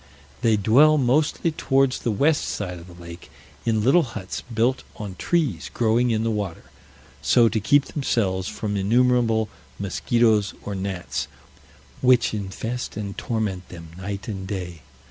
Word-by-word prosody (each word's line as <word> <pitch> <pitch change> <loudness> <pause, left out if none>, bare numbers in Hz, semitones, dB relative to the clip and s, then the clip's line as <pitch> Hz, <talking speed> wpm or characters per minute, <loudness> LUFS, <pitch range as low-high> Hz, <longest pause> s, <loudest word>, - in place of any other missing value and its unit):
They 110 -2 +3
dwell 140 +10 +5
mostly 150 +5 +2
towards 135 -3 +1
the 120 - -2
west 145 +8 +2
side 90 -4 -4
of 85 - -13
the 90 -1 -14
lake, 85 0 -11 0.4
in 110 -2 +2
little 140 +9 +5
huts 110 - -5
built 120 +4 +1
on 105 -3 -6
trees 165 - -1
growing 120 +1 +2
in 110 -1 +1
the 115 - 0
water; 100 -6 -4 0.5
so 115 +9 +5
to 110 - 0
keep 140 +8 +3
themselves 95 -10 -1
from 105 -2 -3
innumerable 115 +1 +2 0.3
mosquitoes, 105 +2 +1
or 105 - -4
gnats, 95 -2 -3 0.7
which 125 -3 +4
infest 110 +5 -4
and 100 -2 -4
torment 105 -6 -3
them 85 -2 -10
night 100 +3 -6
and 95 -4 -5
day. 90 -5 -5
110 Hz, 145 wpm, -23 LUFS, 95-125 Hz, 0.7 s, dwell